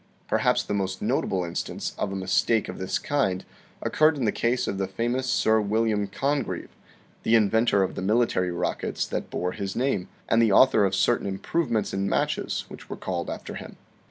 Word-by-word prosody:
Perhaps - - +2
the - - -4
most 95 -2 -1
notable 95 -2 0
instance 85 0 -4
of 100 - -1
a - - -4
mistake 95 +4 +1
of - - -7
this 95 0 -1
kind 115 -11 0 0.4
occurred 155 0 +3
in 130 - -1
the 105 - +3
case 120 +2 0
of 100 - -2
the 95 - 0
famous 120 +6 -1
Sir 110 -2 +3
William 105 0 +1
Congreve, 140 +6 -2 0.5
the 115 - +3
inventor 110 -1 +3
of 95 - -2
the - - -5
military 100 -2 +2
rockets 85 0 -2
that - - -4
bore 90 0 -2
his 95 +1 -4
name, 125 -8 0 0.2
and 115 - +4
the 115 -3 +4
author 110 -1 +6
of 95 0 0
certain 110 +2 +2
improvements 110 +3 -1
in 100 0 0
matches - - -1
which - - -12
were - - -5
called 90 -2 -3
after - - -6
him. - - -8
105 Hz, 185 wpm, -26 LUFS, 95-120 Hz, 0.5 s, author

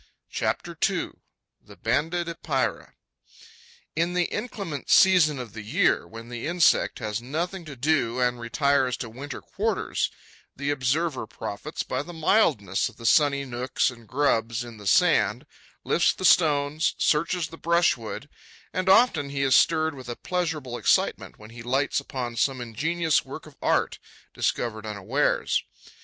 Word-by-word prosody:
CHAPTER - - -2
II: - - -3 0.5
THE - - -15
BANDED 160 +9 0
EPEIRA 155 -5 -2 1.0
In 170 +3 0
the 180 - +3
inclement 195 - -5
season 175 -6 +5
of 120 -6 -7
the 110 - -7
year, 105 - +1
when 115 +1 -10
the 120 +3 -5
insect 175 -1 +3
has 110 -1 -3
nothing 170 +8 -4
to 150 -3 -8
do 130 -3 +1
and 125 -1 +1
retires 130 +1 +1
to 115 -3 -6
winter 135 +3 -7
quarters, - - -1 0.5
the 140 +1 -2
observer 140 -1 -1
profits 110 +7 -6
by 130 - -2
the 175 +4 -9
mildness 155 - +2
of - - -19
the 115 - -10
sunny 140 +2 +3
nooks 125 +1 -1
and 115 -3 -15
grubs 120 -4 0
in 120 -2 -10
the 105 -1 -8
sand, - - +3 0.4
lifts - - +2
the 185 - -4
stones, 150 -2 +3
searches 165 +2 +1
the 165 - -11
brushwood; 165 -7 0 0.5
and 185 0 -1
often 190 - +4
he 140 0 -2
is 135 -1 +3
stirred 160 +1 +4
with 130 -3 -10
a 120 - -3
pleasurable 155 -9 -3
excitement, - - +1
when 110 +1 -13
he 115 0 -10
lights 135 +5 0
upon 125 -4 -5
some 130 +3 0
ingenious 155 +7 0
work - - -9
of - - -15
art, - - +1 0.3
discovered 110 -3 -2
unawares. 110 +7 0
140 Hz, 150 wpm, -25 LUFS, 120-160 Hz, 1.0 s, season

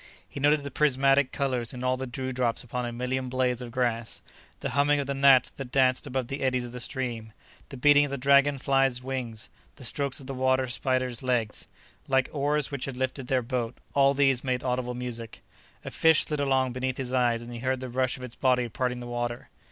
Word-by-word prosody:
He - - -8
noted 145 +1 +3
the 140 - -6
prismatic 135 -2 +3
colors 130 -5 -1
in 125 - -6
all 130 0 +2
the 130 +1 -5
dewdrops 125 -1 -2
upon 125 0 -4
a - - -4
million 125 +2 -3
blades 125 -1 0
of 125 - -6
grass. 120 -2 -2 0.4
The - - -3
humming 145 +1 +3
of 140 - -1
the 140 - -2
gnats 135 -1 +5
that 135 -3 -8
danced 130 -1 +2
above 130 -1 -2
the 135 +3 -5
eddies 130 -1 +1
of 120 - -7
the 125 - -7
stream, 120 -4 -4 0.4
the 135 - -8
beating 145 +2 +6
of - - -5
the 140 - -3
dragon 140 +1 +4
flies' 135 -2 +1
wings, 125 -4 -4 0.3
the - - -13
strokes 140 +2 0
of 135 - -10
the 135 - -5
water 130 0 +2
spiders' 130 -1 -1
legs, 120 -4 -1 0.4
like 130 -1 +2
oars 145 0 +1
which 140 -3 -3
had 135 -2 -6
lifted 130 0 -3
their 130 -1 +1
boat—all 130 +3 0
these 135 -3 +3
made 125 -2 -1
audible 125 -1 -2
music. 120 -2 -6 0.4
A - - -5
fish 160 -1 +5
slid 150 -1 -3
along 135 -2 +1
beneath 130 +1 -3
his 130 -1 -4
eyes 120 -2 +2
and 120 +1 -9
he 120 - -6
heard 130 +1 -1
the 130 - -5
rush 130 +1 -1
of 130 - -10
its 125 -2 -7
body 125 -2 +1
parting 125 +1 -2
the - - -7
water. 120 0 -4
130 Hz, 215 wpm, -27 LUFS, 125-135 Hz, 0.4 s, beating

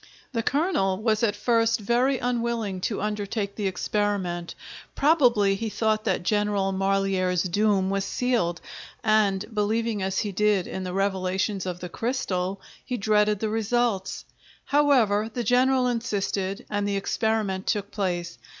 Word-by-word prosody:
The 230 -4 -1
colonel 270 - +1
was 215 -1 +1
at 210 -3 +2
first 230 +1 +2
very 245 +5 +2
unwilling 235 -6 -2
to 205 +1 -2
undertake 210 -1 -2
the 205 -2 -2
experiment, 190 -3 -2 0.4
probably 245 -10 +4
he 220 +3 -3
thought 215 +1 0
that 190 -4 0
General 205 0 +1
Marlière's 190 -2 +1
doom 195 +1 +1
was 195 0 0
sealed, 200 -7 0 0.4
and, 210 -3 +2
believing 215 0 0
as 190 0 -1
he 210 - -3
did 205 -1 +2
in 190 - -5
the 180 -1 -4
revelations 190 0 -1
of 180 -1 -4
the 180 - -4
crystal, 195 -5 -2 0.2
he 250 - -3
dreaded 210 -1 +2
the 220 - 0
results; 225 -2 -1 0.4
however, 245 -8 +3
the 240 +2 -3
general 255 +1 +3
insisted 205 -5 -2
and 205 -1 -1
the 200 -1 0
experiment 200 -2 -1
took 205 -1 -1
place. 175 -4 -3
205 Hz, 140 wpm, -25 LUFS, 195-230 Hz, 0.4 s, probably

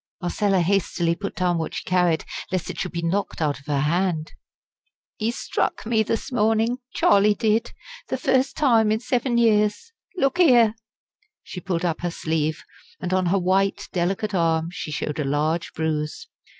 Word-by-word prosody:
Marcella 190 +1 +1
hastily 175 -2 +1
put 200 +4 -6
down 175 -1 +1
what 160 - -4
she - - -4
carried, 180 -3 +1 0.3
lest 185 -1 -2
it 170 - -9
should 180 - -3
be 170 -1 -4
knocked 195 +4 -1
out 150 -3 0
of 140 - -21
her 145 -2 0
hand. 165 +1 0 0.9
"He 220 +1 -1
struck 240 - -2
me 225 -1 +2
this 225 +4 -2
morning! 225 +1 +1 0.2
Charlie 205 +1 +4
did 220 +2 +1 0.4
the - - -2
first 265 -2 +1
time 230 -7 +4
in 215 - +1
seven 245 0 0
years. 215 - +2 0.3
Look 275 +2 +1
here!" 240 -10 +6 0.7
She 180 - -7
pulled 180 -2 -2
up 165 -2 -1
her 175 - -1
sleeve, 160 -2 -2 0.4
and 180 - -3
on 185 -1 +2
her 190 +3 +2
white, 190 +2 +1
delicate 190 +4 -1
arm 165 -2 +1
she 180 - -6
showed 150 0 -3
a - - +1
large 150 +4 -1
bruise. 155 -1 -2
185 Hz, 170 wpm, -23 LUFS, 165-220 Hz, 0.9 s, here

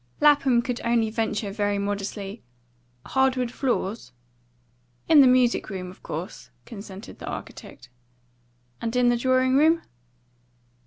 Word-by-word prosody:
Lapham 280 -5 +4
could 245 -1 -3
only 230 -2 +1
venture 215 -2 -2
very 205 0 -1
modestly, 200 +1 -4 0.6
"Hard 265 -1 +2
wood 250 -2 -2
floors?" 235 -5 -2 1.0
"In 310 -3 +7
the 265 - +7
music 250 -2 +3
room, 185 -2 -6
of 185 - -18
course," 170 +7 -7 0.2
consented 200 -3 -10
the - - -8
architect. - - -8 0.9
"And 230 +1 -3
in 250 -1 +4
the 240 - +3
drawing 255 +1 +2
room?" 325 +3 +4
235 Hz, 125 wpm, -25 LUFS, 205-255 Hz, 1.0 s, In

